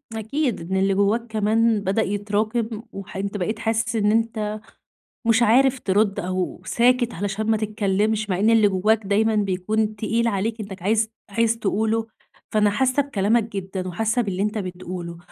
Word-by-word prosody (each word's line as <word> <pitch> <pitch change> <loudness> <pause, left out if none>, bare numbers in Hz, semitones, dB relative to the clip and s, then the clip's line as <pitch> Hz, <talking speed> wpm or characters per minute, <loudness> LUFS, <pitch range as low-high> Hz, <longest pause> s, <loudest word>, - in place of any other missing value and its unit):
أكيد 220 - -2
إن 190 - +1
اللي 195 0 +2
جوّاك 210 +4 +1
كمان 220 0 +2
بدأ 195 +3 +1
يتراكم، 215 +2 -1
وح 195 -1 -9
أنت 200 +1 -3
بقيت 215 +4 -2
حاسس 225 +1 -1
إن 210 -1 +2
أنت 220 -2 0 0.7
مش 230 +1 +4
عارف 260 +3 +4
ترد، 200 0 +1
أو 185 0 -3
ساكت 245 0 +2
علشان 205 +3 -3
ما 220 - +3
تتكلمش، 210 0 0
مع 185 0 0
إن 215 +2 +3
اللي 220 -2 +5
جوّاك 205 +3 +2
دايمًا 220 +2 +2
بيكون 210 +2 0
تقيل 230 +2 0
عليك، 220 +2 -1
إنّك 195 -3 -8
عايز 220 +3 +1 0.2
عايز 230 +2 +1
تقوله. 220 +2 0 0.4
فأنا 210 -1 +3
حاسّة 260 +6 +2
بكلامك 225 -3 +1
جدًا، 190 -3 -5
وحاسة 225 +6 0
باللي 195 -3 -2
أنت 210 +1 -1
بتقوله. 180 -2 -6
215 Hz, 160 wpm, -23 LUFS, 195-225 Hz, 0.7 s, اللي